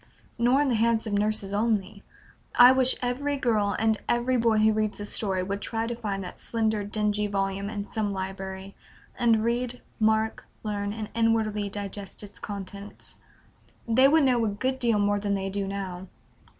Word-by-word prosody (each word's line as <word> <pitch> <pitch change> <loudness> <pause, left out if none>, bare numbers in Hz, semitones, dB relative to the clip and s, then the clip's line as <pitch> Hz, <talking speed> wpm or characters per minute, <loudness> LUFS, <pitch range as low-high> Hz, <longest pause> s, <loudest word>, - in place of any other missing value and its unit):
Nor 245 +4 +4
in 290 - +2
the - - +2
hands 230 -1 +2
of 215 - -3
nurses 205 -1 0
only; 210 -2 0 0.5
I 245 +1 +9
wish 260 -1 +4
every 280 +4 -1
girl 215 -6 +1
and 220 0 +1
every 240 +2 +2
boy 230 -2 +3
who 215 0 +4
reads 215 -1 -1
this 205 0 -4
story 190 -4 0
would 200 +2 -3
try 225 -1 -2
to 240 - -2
find 205 -4 -3
that 180 - -9
slender, 220 -2 0
dingy 210 0 0
volume 195 0 -1
in 205 -1 -5
some 215 -2 -2
library, 190 0 -5 0.4
and 230 -2 +3
"read, 245 +1 -1 0.2
mark, 220 0 +1 0.2
learn, 205 -1 -2
and 215 0 -5
inwardly 220 -2 +1
digest" 200 0 -7
its 205 0 -9
contents. 200 0 -5 0.7
They 255 +4 +5
would 310 +2 +5
know 250 -3 +3
a - - +2
good 260 +6 -2
deal 235 -4 +2
more 205 0 +2
than 200 0 0
they 195 0 -3
do 200 0 -2
now. 190 -2 -5
215 Hz, 175 wpm, -27 LUFS, 200-230 Hz, 0.7 s, I